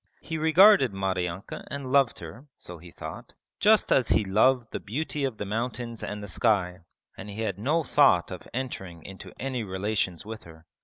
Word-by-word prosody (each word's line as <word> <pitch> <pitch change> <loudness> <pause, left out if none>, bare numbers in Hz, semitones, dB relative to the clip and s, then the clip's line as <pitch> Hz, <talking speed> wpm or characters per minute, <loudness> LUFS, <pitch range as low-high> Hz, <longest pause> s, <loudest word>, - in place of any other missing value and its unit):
He 160 -1 -5
regarded 160 - +6
Maryanka 95 -1 -3
and 140 -2 -5
loved 140 -3 +3
her 125 +8 -10
(so 90 -1 -10
he 90 +2 -13
thought) - - -9 0.3
just 215 +1 +4
as 125 -4 +4
he 105 - +3
loved 115 +5 +2
the - - -4
beauty 145 +5 -3
of 130 -5 -4
the 105 - -4
mountains 115 +2 -4
and 105 0 -5
the - - -6
sky, 95 -2 +1 0.4
and 105 - -9
he 105 +2 -6
had 100 -4 -3
no 155 +9 +1
thought - - +3
of - - -8
entering 95 -10 -6
into 95 -1 -10
any 130 -2 -3
relations 95 -2 -2
with 110 +1 -7
her. 80 0 -15
110 Hz, 185 wpm, -27 LUFS, 95-135 Hz, 0.4 s, regarded